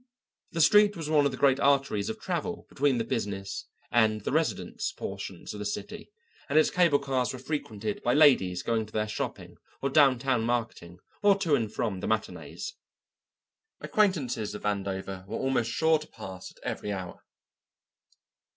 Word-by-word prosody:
The 165 - -1
street 205 +4 +6
was 160 -2 -4
one 150 -2 +4
of 140 - +2
the 130 - -6
great 135 -1 +4
arteries 135 -7 +2
of 220 - -5
travel 210 +3 -3
between 140 -2 +1
the 115 - 0
business 100 -3 -4 0.2
and 110 -2 +3
the - - -3
residence 160 +2 -1
portions - - -6
of - - -7
the - - -3
city, - - -5 0.4
and 145 - +2
its 155 - +5
cable 170 -5 +4
cars 135 -3 -1
were 130 - -6
frequented 115 -7 -4
by 120 - +2
ladies 95 - +5
going 110 -2 0
to 110 - -18
their 105 0 0
shopping 105 - -5 0.2
or 140 - -1
downtown 135 -4 +4
marketing 115 -7 -2 0.2
or 200 -1 +5
to 170 -6 0
and 115 -6 +1
from 100 -5 -2
the - - -4
matinées. 110 - -3 1.1
Acquaintances 135 - 0
of - - -8
Vandover 95 -2 -3
were 110 - -4
almost 130 -3 0
sure 160 +4 +3
to 155 - -10
pass 95 -4 -9
at - - -23
every 105 - -3
hour. 95 -3 -6
125 Hz, 170 wpm, -28 LUFS, 105-150 Hz, 1.1 s, street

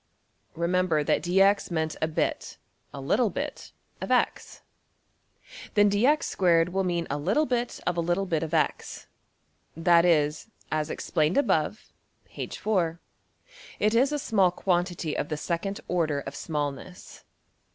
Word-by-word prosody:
Remember 170 -2 +1
that - - +1
$dx$ 195 +3 +3
meant 160 -2 -2
a 155 - +2
bit 160 - -2 0.3
a 140 - -8
little 210 - +1
bit - - -6 0.3
of~$x$. - - -1 1.1
Then 205 -1 +5
$(dx)^2$~will 195 - +2
mean 175 -2 -1
a 145 - -2
little 205 - +1
bit 245 -2 -2
of 175 -1 -1
a - - +2
little 175 +3 0
bit 165 -4 -1
of~$x$; 160 -1 -2 0.7
that 170 0 +4
is, 155 +2 +1 0.2
as 155 -1 -1
explained 155 - 0
above 285 - 0 0.4
(\Pageref{smallness}), 175 -6 -1 0.8
it 215 +1 +1
is 260 +5 +3
a 295 - 0
small 205 -9 +2
quantity 175 -3 -1
of - - -3
the 155 - -2
second 180 +6 -3
order 155 -5 0
of 135 0 -8
smallness. 150 +4 -5
175 Hz, 130 wpm, -27 LUFS, 160-195 Hz, 1.1 s, Then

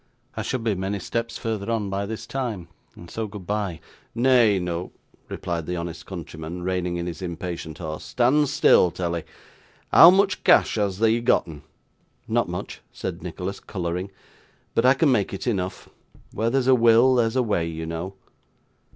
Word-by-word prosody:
'I - - -3
should 125 -3 -3
be 110 -2 +1
many 95 +2 -2
steps 115 +5 -3
further 110 -2 -3
on 105 -4 -1
by 100 +1 -2
this 110 0 -6
time, 115 -10 -4 0.3
and 85 - -12
so 110 +5 -4
goodbye!' 100 -3 -4 0.4
'Nay 120 -4 +4
noo,' 90 -1 -3 0.4
replied 85 -2 -4
the 90 - -2
honest 85 -1 -6
countryman, 85 -1 -7
reining 90 -1 -1
in 85 - -3
his 90 +1 -6
impatient 85 -2 -5
horse, 80 -3 -6
'stan' 125 - +2
still, 130 -8 +5
tellee. 85 -1 -3 0.7
Hoo 165 - +10
much 195 +1 +2
cash - - +5
hast 100 -2 -1
thee 115 +1 +3
gotten?' 80 - +1 0.7
'Not - - +1
much,' - - -6
said - - -5
Nicholas, 95 +2 -5
colouring, 90 0 -4 0.6
'but 115 - +3
I 130 - +6
can 145 +1 +3
make 100 -5 +1
it - - -6
enough. 95 -6 -2 0.5
Where 115 +1 0
there's 130 +1 +1
a 130 - +5
will, 120 +1 +5
there's 115 -2 +2
a 130 - +3
way, 95 -7 0
you 80 0 -5
know. 85 +4 -5
100 Hz, 170 wpm, -24 LUFS, 85-115 Hz, 0.7 s, Hoo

